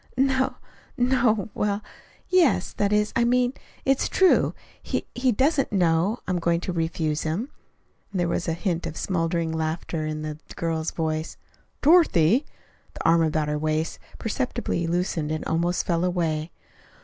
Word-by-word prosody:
"N 270 0 +3 0.6
no 250 -1 +3 0.2
er - - -12
well, 205 0 -1 0.4
yes. 360 -6 +3
That 205 0 0
is, 210 0 +2
I 235 - +3
mean, 245 +1 +2 0.3
it's 270 0 +2
true. 380 -1 +4 0.3
He - - -3
he 250 +1 +2
doesn't 275 +5 +2
know 180 +2 +2
I - - -1
am 180 - 0
going 170 0 +1
to 180 - -3
refuse 160 -2 -1
him." 175 - -2 0.6
There 180 -3 0
was 170 0 -1
a 165 - +1
hint 175 0 -2
of 155 - -7
smothered 165 -2 -1
laughter 160 0 -2
in 155 0 -4
the 155 0 -5 0.2
girl's 165 -1 -1
voice. 160 0 -3 0.5
"Dorothy!" 280 - +5 0.5
The - - -6
arm 165 0 +5
about 155 -1 +1
her 150 0 -1
waist 155 +1 -1 0.2
perceptibly 230 -6 -2
loosened 170 -3 -1
and 155 - -3
almost 170 +2 0
fell 170 -1 +1
away. 165 -3 0
170 Hz, 155 wpm, -25 LUFS, 160-235 Hz, 0.6 s, Dorothy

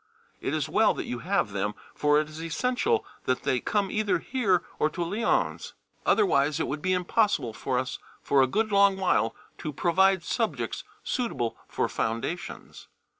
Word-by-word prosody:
It - - -2
is - - -1
well - - +3
that - - -4
you 120 - -4
have 180 - 0
them, 100 +1 -2 0.2
for 150 0 +3
it 155 - -1
is 155 +1 -9
essential 255 - 0 0.2
that 130 - 0
they 125 - +1
come 200 +4 0
either 215 -1 +1
here 195 -2 +1 0.2
or 155 - +3
to 175 +2 -3
Lyons, 205 +7 -1 0.3
otherwise 155 - +3
it - - +1
would 145 +2 -3
be 185 - 0
impossible 180 - +1
for 130 +3 -2
us 130 0 -2 0.2
for 140 -1 +3
a 130 - +4
good 215 - 0
long 200 -1 +5
while 115 - +1 0.2
to 155 - -4
provide 190 +4 +3
subjects 225 +5 -2 0.2
suitable 135 - -1
for - - -1
foundations. 115 +10 -4
175 Hz, 170 wpm, -27 LUFS, 135-205 Hz, 0.3 s, long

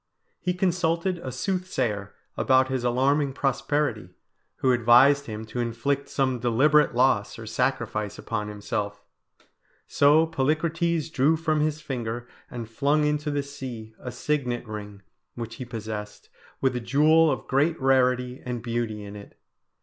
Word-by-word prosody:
He 180 +1 -1
consulted 180 -1 0
a 130 -6 -6
soothsayer 130 - -2 0.2
about 130 0 +3
his 130 -2 -2
alarming 135 +3 +2
prosperity, 135 -7 -1 0.4
who 130 - +2
advised 125 +4 +5
him 110 0 -6
to 115 +3 -6
inflict 120 +4 -1
some 130 -3 0
deliberate 135 +4 +3
loss 125 -5 +2
or 115 - -8
sacrifice 110 -3 -1
upon 105 -2 -3
himself; 105 0 -4 0.8
so 150 +3 +4
Polycrates 160 +2 0
drew 150 +4 +3
from 155 -1 0
his 155 0 0
finger 120 -3 -4 0.2
and 120 -2 -6
flung 145 +6 +1
into 150 0 0
the 145 -1 -1
sea 125 -6 -8
a 125 - -6
signet 125 -2 -2
ring 105 -2 -8 0.3
which 115 -1 -6
he 130 - -6
possessed, 110 -3 -7 0.3
with 130 -2 +1
a - - 0
jewel 155 +6 +4
of - - -2
great 150 +5 +1
rarity 125 -1 +2
and 120 -2 -4
beauty 115 -3 -3
in 100 0 -9
it. 100 0 -12
130 Hz, 140 wpm, -26 LUFS, 115-150 Hz, 0.8 s, advised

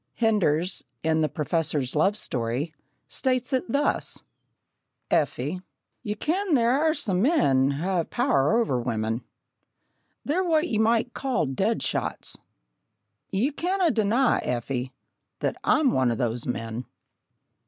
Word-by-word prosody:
Henders, 185 -6 +1 0.2
in 160 0 +2
The 155 - +1
Professor's 150 -4 -1
Love 195 +7 +3
Story, 130 - -2 0.3
states 255 -1 -1
it 255 -3 0
thus: 285 +3 0 0.9
"Effie, 150 +5 0 0.4
ye 210 0 -3
ken 340 - 0
there 235 -2 +3
are 310 +4 +2
some 190 - 0
men 140 - +3
ha' 175 +6 0
a 165 - 0
power 235 - +2
o'er 130 - +1
women.... 115 -1 -2 1.0
They're 340 +6 +1
what 330 -1 +2
ye 220 -9 0
might 230 +2 +2
call 260 - 0
'dead 135 -1 0
shots.' - - -2 0.9
Ye 220 +10 +1
canna 355 +3 +1
deny, 230 +3 +2
Effie, 125 +1 -2 0.5
that - - -1
I'm 305 -5 +3
one 130 -2 +2
o' - - 0
those 120 0 -2
men!" 115 0 -3
190 Hz, 130 wpm, -26 LUFS, -, 1.0 s, Love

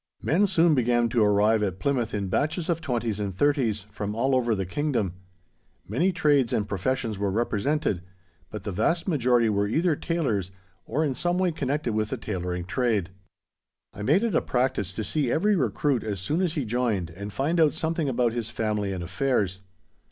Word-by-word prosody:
Men 195 +7 +3
soon 170 -3 +4
began 120 -3 +2
to 115 -1 +2
arrive 105 +1 +3
at 95 -3 -1
Plymouth 130 -2 0
in 100 -2 -2
batches 155 - -1
of 165 -1 0
twenties 120 -7 -2
and 100 -3 -3
thirties, 120 -7 +1
from 105 0 -4
all 130 +4 +1
over 120 -3 +2
the 95 -1 -2
Kingdom. 120 - -1 0.7
Many 165 - +1
trades 145 -8 +2
and 105 - 0
professions 110 +2 -2
were 100 -1 0
represented, 115 - 0 0.5
but 105 -3 -7
the 105 - -3
vast 165 - 0
majority 125 -8 +3
were 100 -1 +1
either 160 - +2
tailors 130 - -1 0.4
or 150 +7 0
in 140 - 0
some 175 +6 0
way 185 -1 +2
connected 145 -5 -2
with 110 0 0
the 130 - -3
tailoring 90 -5 -4
trade. 105 -3 0 0.8
I 105 - -9
made 150 - +3
it 230 -4 0
a - - +3
practice 125 -7 0
to 110 - -3
see 140 0 0
every 205 +5 +3
recruit 135 - 0
as 105 -3 -3
soon 150 - -1
as 175 -4 +1
he 145 -5 -1
joined 110 -7 -1
and 100 +4 -7
find 155 - 0
out 155 -2 +5
something 160 -2 -1
about 120 -2 +1
his 115 -2 -3
family 105 -3 -1
and 90 -2 -4
affairs. 95 -1 -1
120 Hz, 190 wpm, -26 LUFS, 105-150 Hz, 0.8 s, out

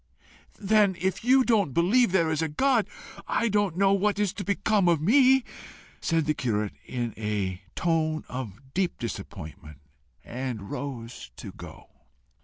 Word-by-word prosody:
"Then 205 -2 +3
if 190 +2 -1
you 260 +2 +5
don't 205 - +1
believe 200 +6 +4
there 170 -4 +2
is 160 0 0
a 160 - +1
God 235 - +2 0.4
I 235 - +1
don't 205 -4 +1
know 195 0 +4
what 205 +1 +1
is 205 -2 0
to 200 0 -5
become 200 -1 +2
of 170 -3 +3
me," 260 - +5 0.6
said 165 -2 +1
the 155 - +1
curate, 105 -7 -1
in 120 -3 -3
a 100 -4 -2
tone 155 -2 0
of 130 +1 -8
deep 185 -1 0
disappointment, 95 - -7 0.5
and 120 -5 -5
rose 125 - -6
to - - -8
go. - - -12
165 Hz, 150 wpm, -27 LUFS, 120-205 Hz, 0.6 s, you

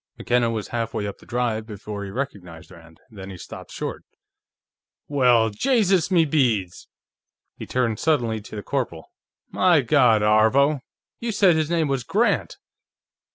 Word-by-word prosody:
McKenna 120 -1 +1
was 110 -3 -4
halfway 115 -3 -3
up 100 - -6
the - - -19
drive 115 -2 -2
before 105 -1 -7
he 100 - -6
recognized 95 - -6
Rand. 85 -2 -16
Then 95 -3 -9
he 95 - -9
stopped - - -10
short. - - -5 1.0
"Well, 125 -6 +3
Jaysus 195 - +2
me 170 -4 +4
beads!" 120 - 0 0.7
He - - -9
turned 120 -4 -1
suddenly 120 -9 0
to 110 - -11
the 105 - -6
corporal. 120 - -4 0.4
"My 175 -5 +4
God, 125 -5 +3
Aarvo; 110 +8 +3 0.4
you 235 0 -3
said 195 -5 +4
his 155 -1 0
name 165 -3 +1
was 135 -3 -1
Grant!" - - 0
120 Hz, 150 wpm, -23 LUFS, 105-145 Hz, 1.0 s, me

